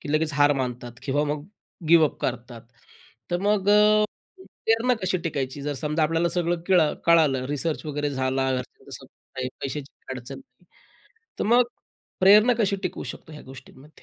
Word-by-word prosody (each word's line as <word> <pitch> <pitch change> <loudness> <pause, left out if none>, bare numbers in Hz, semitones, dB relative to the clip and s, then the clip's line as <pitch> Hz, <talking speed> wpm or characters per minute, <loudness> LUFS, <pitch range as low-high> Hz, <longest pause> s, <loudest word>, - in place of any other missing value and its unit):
की 145 - -5
लगेच 155 0 +1
हार 145 0 +4
मानतात 125 -1 -5
किंवा 145 +2 0
मग 145 0 -3 0.4
गिव्हअप 160 -3 +4
करतात. 120 -1 -4 0.7
तर 175 - 0
मग 205 -1 +1
अ, 210 0 +5 0.6
प्रेरणा 230 +3 +2
कशी 185 0 0
टिकायची, 140 -3 -3
जर 145 - -2
समजा 150 +4 -1
आपल्याला 165 +2 +1
सगळं 175 -1 -1
केळ 185 -2 +5 0.3
कळालं 155 -6 +4
रिसर्च 150 +3 -2
वगैरे 145 -1 -2
झाला. 130 0 -1
घरच्यांचा 125 -1 -8
सपोर्ट - - -18
आहे, 130 - -2
पैशाची 140 +1 -5
पण - - -44
काही - - -6
अडचण 120 -1 -9
नाही. 270 - -22 0.8
तर - - 0
मग, 250 - +6 0.6
प्रेरणा 210 +6 +6
कशी 200 -3 +2
टिकू - - -4
शकतो 160 - -14
ह्या 150 - -10
गोष्टींमध्ये? 130 +2 -14
150 Hz, 165 wpm, -24 LUFS, 135-180 Hz, 0.8 s, मग